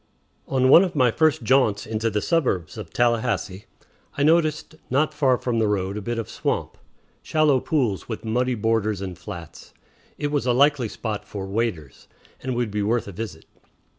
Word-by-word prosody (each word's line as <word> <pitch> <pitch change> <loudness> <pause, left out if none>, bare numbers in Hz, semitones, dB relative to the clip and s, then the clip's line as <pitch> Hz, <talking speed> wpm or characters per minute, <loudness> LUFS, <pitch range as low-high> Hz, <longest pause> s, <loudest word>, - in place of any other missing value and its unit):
On 130 -1 +2
one 165 +7 +9
of 185 - -3
my 125 -4 +4
first 155 -2 +2
jaunts 115 -4 +2
into 110 +1 -1
the 105 -1 -2
suburbs 125 - 0
of - - -7
Tallahassee 115 -5 0 0.5
I 140 - +1
noticed 155 0 +2 0.2
not 150 +4 +1
far 135 -4 +2
from 120 -2 -1
the 110 - +2
road 100 -1 -1
a 105 - -4
bit 120 +3 -3
of 115 - -3
swamp, - - -3 0.5
shallow 155 -4 +2
pools 125 - -1
with 110 0 -5
muddy 125 +3 0
borders 110 -2 0
and 95 -2 -5
flats. 85 -4 -10 0.4
It 145 0 -2
was 145 -3 0
a 125 - +3
likely 140 -1 +3
spot 105 -1 -5
for 100 -2 -6
"waders," 95 - -3 0.3
and 130 -1 -3
would 120 -3 -1
be 105 0 -1
worth 110 +2 0
a - - -6
visit. 95 -5 -7
115 Hz, 180 wpm, -23 LUFS, 105-135 Hz, 0.5 s, one